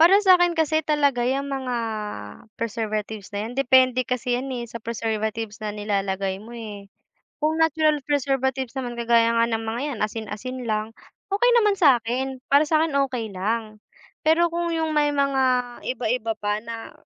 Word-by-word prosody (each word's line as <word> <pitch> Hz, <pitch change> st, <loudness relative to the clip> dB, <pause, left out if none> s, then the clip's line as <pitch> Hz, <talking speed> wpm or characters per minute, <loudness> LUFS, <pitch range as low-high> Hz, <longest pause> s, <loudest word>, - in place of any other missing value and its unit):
para 350 Hz, +5 st, +8 dB
sa'kin 350 Hz, -2 st, +5 dB
kasi 315 Hz, -1 st, +2 dB
talaga 285 Hz, -5 st, +1 dB
yang 275 Hz, +1 st, 0 dB
mga 260 Hz, -2 st, -2 dB, 0.8 s
preservatives 215 Hz, -2 st, -3 dB
na 205 Hz, -, -2 dB
'yan, 235 Hz, -, -6 dB
depende 255 Hz, -1 st, +4 dB
kasi 250 Hz, 0 st, -1 dB
'yan 260 Hz, +2 st, -4 dB
eh, 240 Hz, -, -4 dB
sa 235 Hz, 0 st, -8 dB
preservatives 220 Hz, -1 st, -3 dB
na 210 Hz, -1 st, -4 dB
nilalagay 195 Hz, -2 st, -1 dB
mo 235 Hz, +3 st, -10 dB
eh. 205 Hz, -3 st, -8 dB, 0.5 s
Kung 310 Hz, +1 st, +1 dB
natural 310 Hz, -2 st, +2 dB
preservatives 270 Hz, -2 st, -1 dB
naman 240 Hz, -2 st, -4 dB
kagaya 230 Hz, 0 st, +4 dB
nga 230 Hz, 0 st, +4 dB
ng 225 Hz, -1 st, -2 dB
mga 225 Hz, +2 st, -3 dB
'yan 235 Hz, -, -6 dB
asin-asin 225 Hz, +3 st, -5 dB
lang, 215 Hz, +1 st, -1 dB, 0.4 s
okey 485 Hz, +5 st, +4 dB
naman 420 Hz, -3 st, +4 dB
sa'kin, 255 Hz, -3 st, +3 dB, 0.2 s
para 295 Hz, +2 st, +5 dB
sa'kin 315 Hz, -1 st, +2 dB, 0.2 s
okey 230 Hz, -5 st, -4 dB
lang. 215 Hz, +3 st, -3 dB, 0.4 s
Pero 330 Hz, +2 st, +3 dB
kung 340 Hz, 0 st, -1 dB
yung 320 Hz, -1 st, -1 dB
may 295 Hz, -1 st, +3 dB
mga 260 Hz, -3 st, +1 dB
iba-iba 230 Hz, -2 st, -1 dB
pa 210 Hz, 0 st, -1 dB
na 230 Hz, 0 st, -8 dB
245 Hz, 160 wpm, -24 LUFS, 220-285 Hz, 0.8 s, para